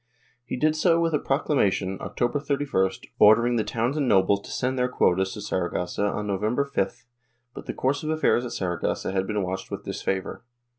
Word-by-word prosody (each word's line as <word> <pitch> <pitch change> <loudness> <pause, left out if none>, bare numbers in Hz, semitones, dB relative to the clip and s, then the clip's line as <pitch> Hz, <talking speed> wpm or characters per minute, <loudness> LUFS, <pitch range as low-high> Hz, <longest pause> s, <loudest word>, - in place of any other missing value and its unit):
He 125 - -5
did 155 +4 +2
so 165 +1 +3
with 165 -1 +1
a 150 - +2
procla 135 +2 -1
mation, 95 -5 +1
October 120 +4 -1
31st, 140 -10 -1
ordering 115 +3 +6
the 110 - +1
towns 120 +6 -1
and 145 -4 0
nobles 100 -1 +3
to - - -12
send 130 +1 -1
their 125 - +2
quotas 95 -5 +2
to 105 - -7
Saragossa 90 0 -2
on 105 +1 -2
November 105 +7 0
5th, 140 - -2 0.5
but - - -10
the - - -3
course 140 +2 0
of 155 - -4
affairs 155 -6 +2
at 125 - -5
Saragossa 90 0 -2
had 95 0 -1
been 105 -1 -1
watched 95 +1 -4
with - - -6
disfavor. 95 +2 -3
115 Hz, 195 wpm, -25 LUFS, 95-140 Hz, 0.5 s, ordering